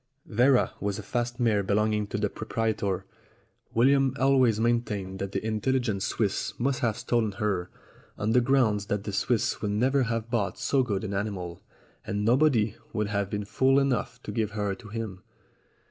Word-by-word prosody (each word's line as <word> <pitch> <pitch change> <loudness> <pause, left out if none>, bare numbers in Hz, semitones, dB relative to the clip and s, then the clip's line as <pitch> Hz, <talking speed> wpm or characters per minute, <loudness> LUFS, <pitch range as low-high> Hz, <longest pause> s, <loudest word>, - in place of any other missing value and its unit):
Vera 125 +3 +3
was 100 -1 -2
a - - -6
fast 120 0 -2
mare 110 -4 +3
belonging 105 +1 +1
to 100 - -3
the 105 0 +1
proprietor. 110 -3 -2 0.7
William 135 +2 +4
always 130 -5 +4
maintained 105 -5 -1
that 100 0 -3
the - - -3
intelligent 110 -1 0
Swiss 100 0 -1
must 130 +2 0
have 115 -3 0
stolen 115 -4 0
her, 95 -3 -1 0.5
on 105 +2 0
the 125 +2 +5
grounds 115 -6 +2
that 105 -1 -1
the 105 - -5
Swiss 115 +2 0
would 105 - -1
never 130 +7 +2
have 115 -1 -2
bought 110 -5 0
so 135 - +2
good 105 -6 -1
an 100 -2 -3
animal, 95 -4 -3 0.4
and 105 +1 -2
nobody 120 -4 +3 0.2
would 105 -2 -1
have 100 -2 -1
been 105 0 -3
fool 135 +6 +3
enough 135 -2 0
to - - -5
give 110 -1 -1
her 105 -2 -1
to 110 +3 -11
him. 105 -4 -5
110 Hz, 175 wpm, -27 LUFS, 100-120 Hz, 0.7 s, the